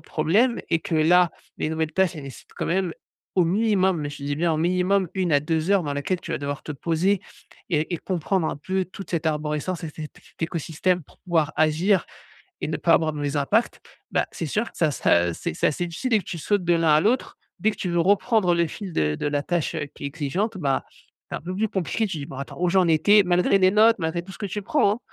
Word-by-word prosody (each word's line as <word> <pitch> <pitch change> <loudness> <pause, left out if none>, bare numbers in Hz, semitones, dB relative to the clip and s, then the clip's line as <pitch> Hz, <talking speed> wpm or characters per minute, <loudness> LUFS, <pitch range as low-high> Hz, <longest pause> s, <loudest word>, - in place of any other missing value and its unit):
problèmes, 210 +11 +2
et 165 - +3
que 200 -5 -3
là 170 +2 +5 0.3
les - - -1
nouvelles 160 -1 -1
tâches 190 -2 +2
elles 150 - -7
nécessitent 135 -5 -11
quand - - -2
même 180 -1 0 0.4
au 180 - +4
minimum, 190 -1 +2
mais 145 -1 -3
je 145 - -9
te - - -10
dis 145 0 -2
bien 170 +1 +1
au 155 - 0
minimum 180 +3 +2
1 185 -4 0
à 145 - +5
2 160 +3 -1
heures 200 -2 +4
dans 145 -3 -3
laquelle 170 +6 -2
tu 165 - -8
vas - - -1
devoir 140 0 -4
te - - -8
poser 170 +6 0 0.5
et 160 +1 0
et 170 - -3
comprendre 185 -1 -1
un - - -4
peu 190 +5 -2
toute 190 +2 -10
cette 165 -2 -1
arborescence 150 +3 -2
et - - -4
cet - - -25 0.2
cet - - -14
écosystème 170 +2 -1
pour - - -23
pouvoir 165 -4 0
agir 160 +4 +3 0.6
et - - -2
ne 155 - -2
pas 165 -1 +3
avoir 160 -2 +2
de 150 - -7
mauvais 145 0 -2
impacts. 205 +12 +1 0.3
Bah, - - +1
c'est 165 - -4
sûr 215 +9 0
que - - -18
ça 160 - +3
ça 85 -9 +2
c'est - - -4
c'est - - +2
assez 175 +4 -1
difficile 230 +9 -3
et - - +4
que - - -10
tu 170 - -5
sautes 200 +3 0
de 175 - +4
l'un 165 -1 +2
à 150 - +5
l'autre, 235 +8 0 0.2
dès 220 - +2
que - - -12
tu 185 - -3
veux 175 0 +1
reprendre 200 0 +3
le 170 -1 +2
fil 195 +4 -7
de 75 -1 +1
de 145 - -2
la 145 0 -1
tâche, 170 -2 -1
heu, 155 -2 -2
qui - - -10
est - - 0
exigeante, 165 +9 -2
bah, 140 -6 0 0.5
c'est - - -2
un - - -12
peu 180 +3 -5
plus 220 +2 0
compliqué, 190 +4 -1
tu 185 -5 -4
dis: 140 - -5
«Bon, 135 - -9
attends 140 - -7
où 180 - +3
j'en 185 -1 +3
étais», 185 +7 +5
malgré 180 +2 +3
les 185 0 +5
notes, 220 +2 +5
malgré 165 +1 -2
tout 190 - -11
ce - - -12
que 210 - -3
tu 205 +2 -4
prends, 205 -2 +2
hein! 235 - -7
170 Hz, 260 wpm, -24 LUFS, 155-190 Hz, 0.6 s, là